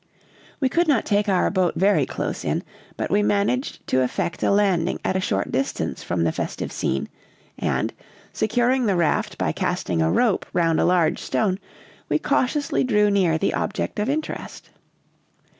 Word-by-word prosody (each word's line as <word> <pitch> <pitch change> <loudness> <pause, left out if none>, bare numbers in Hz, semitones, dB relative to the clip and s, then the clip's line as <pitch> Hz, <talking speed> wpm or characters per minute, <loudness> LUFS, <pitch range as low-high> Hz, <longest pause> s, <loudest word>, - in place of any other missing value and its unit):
We 270 - +2
could 335 +6 +1
not 270 -8 +2
take 205 0 +1
our 185 -2 +2
boat 185 -3 +1
very 200 +3 +3
close - - -4
in, - - -1 0.3
but - - -3
we 205 - +3
managed 205 +6 0
to 130 - +3
effect 130 +6 -2
a - - +2
landing 195 -4 +2
at 185 - 0
a - - +2
short 100 - -1
distance 135 +1 -2
from 85 -1 -1
the 80 - +2
festive - - -4
scene; 70 - -1 0.5
and, - - -1 0.4
securing 245 +2 +1
the 195 - +2
raft 170 -3 0
by - - 0
casting 85 -2 -1
a 80 0 +2
rope 225 -6 +2
round 165 -2 +2
a - - +3
large 175 -2 +2
stone, 195 -3 0 0.5
we - - +3
cautiously 285 +3 0
drew 210 -5 +3
near 180 -5 +3
the 195 - 0
object 210 +1 -2
of 210 +4 0
interest. 305 +2 -4
200 Hz, 170 wpm, -23 LUFS, 170-225 Hz, 0.5 s, very